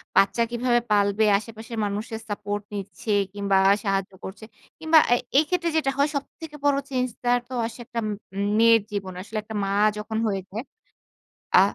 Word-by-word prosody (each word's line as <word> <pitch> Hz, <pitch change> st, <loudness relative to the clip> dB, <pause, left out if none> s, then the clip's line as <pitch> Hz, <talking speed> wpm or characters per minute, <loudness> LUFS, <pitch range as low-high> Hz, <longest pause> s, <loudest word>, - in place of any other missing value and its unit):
বাচ্চা 205 Hz, +4 st, +4 dB
কিভাবে 240 Hz, 0 st, +2 dB
পালবে? 205 Hz, +1 st, +3 dB
আশেপাশের 225 Hz, +2 st, -8 dB
মানুষের 210 Hz, +2 st, -4 dB
support 205 Hz, 0 st, -3 dB
নিচ্ছে 200 Hz, +1 st, -5 dB, 0.2 s
কিংবা 200 Hz, -1 st, 0 dB
আ -, -, +7 dB
সাহায্য 195 Hz, -1 st, 0 dB
করছে। 200 Hz, +3 st, -8 dB, 0.3 s
কিংবা 320 Hz, 0 st, +4 dB
আ -, -, +8 dB, 0.2 s
এই 300 Hz, -, +7 dB
ক্ষেত্রে 345 Hz, -2 st, +1 dB
যেইটা 300 Hz, -4 st, +2 dB
হয় 285 Hz, +2 st, +3 dB
সবথেকে 300 Hz, +2 st, -6 dB
বড় 285 Hz, -1 st, +4 dB
change 255 Hz, -2 st, -1 dB
টা 245 Hz, -, +2 dB, 0.2 s
তো 260 Hz, -, -9 dB
আসে 230 Hz, +2 st, -7 dB
একটা 230 Hz, -, -4 dB
উম 200 Hz, -1 st, -4 dB
মেয়ের 230 Hz, 0 st, +6 dB
জীবনে, 190 Hz, -3 st, -4 dB
আসলে 220 Hz, +1 st, -6 dB
একটা 220 Hz, +1 st, -8 dB
মা 195 Hz, -, -1 dB, 0.3 s
যখন 220 Hz, +1 st, -4 dB
হয়ে 195 Hz, -2 st, -1 dB
যায়। 220 Hz, +5 st, -5 dB, 0.9 s
আ -, -, +9 dB
220 Hz, 175 wpm, -25 LUFS, 200-245 Hz, 0.9 s, আ